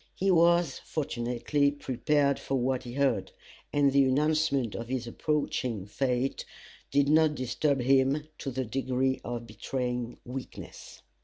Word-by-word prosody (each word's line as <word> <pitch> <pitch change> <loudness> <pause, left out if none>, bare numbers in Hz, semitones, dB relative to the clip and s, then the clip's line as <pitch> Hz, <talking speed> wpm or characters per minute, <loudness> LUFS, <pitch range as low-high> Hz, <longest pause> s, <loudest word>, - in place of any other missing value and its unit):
He 195 +1 +1
was 170 -3 +4
fortunately 125 0 0
prepared 140 +1 0
for 135 - -2
what 130 0 0
he 120 - -7
heard, 130 -8 0 0.4
and 145 -1 +3
the 140 0 +5
announcement 140 -3 +1
of 115 - -5
his 125 -1 -2
approaching 125 -5 -2
fate 125 +4 -1 0.5
did 140 0 +3
not 155 0 +4
disturb 130 +2 0
him 135 +3 +3 0.2
to 135 - -4
the 130 0 -3
degree 130 +2 -1
of 120 0 -5
betraying 125 +2 -4
weakness. 125 +1 -9
135 Hz, 135 wpm, -29 LUFS, 125-145 Hz, 0.5 s, the